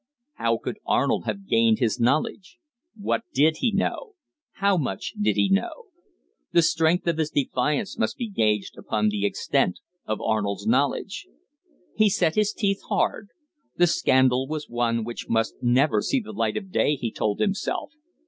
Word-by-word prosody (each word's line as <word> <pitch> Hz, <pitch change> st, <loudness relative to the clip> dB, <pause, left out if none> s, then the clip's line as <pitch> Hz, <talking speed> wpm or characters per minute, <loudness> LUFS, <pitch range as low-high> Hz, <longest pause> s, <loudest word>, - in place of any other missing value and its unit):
How -, -, +1 dB
could -, -, -6 dB
Arnold -, -, +1 dB
have 200 Hz, 0 st, -4 dB
gained 115 Hz, -1 st, +3 dB
his 115 Hz, -4 st, 0 dB
knowledge? 155 Hz, -, 0 dB, 0.4 s
What 205 Hz, -, -1 dB
did 155 Hz, +3 st, +4 dB
he 240 Hz, -, +1 dB
know? 405 Hz, -, -2 dB, 0.4 s
How 200 Hz, 0 st, +2 dB
much 130 Hz, -, -3 dB
did 105 Hz, -1 st, +2 dB
he 100 Hz, -1 st, +3 dB
know? 95 Hz, 0 st, -1 dB, 0.6 s
The 170 Hz, -, +5 dB
strength 165 Hz, +1 st, +2 dB
of 170 Hz, -2 st, 0 dB
his 155 Hz, -1 st, 0 dB
defiance 145 Hz, -, -1 dB
must 230 Hz, -, 0 dB
be 240 Hz, -3 st, -3 dB
gauged 105 Hz, -, 0 dB
upon 105 Hz, 0 st, 0 dB
the 105 Hz, -1 st, 0 dB
extent 90 Hz, -2 st, 0 dB, 0.3 s
of 110 Hz, -, -2 dB
Arnold's 105 Hz, -2 st, -1 dB
knowledge. -, -, 0 dB, 0.7 s
He 215 Hz, -1 st, +4 dB
set 170 Hz, -4 st, +1 dB
his 210 Hz, +1 st, +2 dB
teeth 200 Hz, -2 st, -1 dB
hard. 210 Hz, -, 0 dB, 0.5 s
The 175 Hz, -, +5 dB
scandal 130 Hz, -5 st, +3 dB
was 155 Hz, 0 st, -4 dB
one 115 Hz, -1 st, 0 dB
which 120 Hz, +1 st, -7 dB
must 115 Hz, 0 st, +1 dB
never 130 Hz, +5 st, +3 dB
see 275 Hz, -, +1 dB
the 215 Hz, -2 st, -9 dB
light -, -, -1 dB
of 195 Hz, -3 st, -7 dB
day, 150 Hz, -, +2 dB
he 120 Hz, -5 st, -4 dB
told 105 Hz, -1 st, -2 dB
himself. 200 Hz, +6 st, -1 dB
145 Hz, 165 wpm, -25 LUFS, -, 0.7 s, The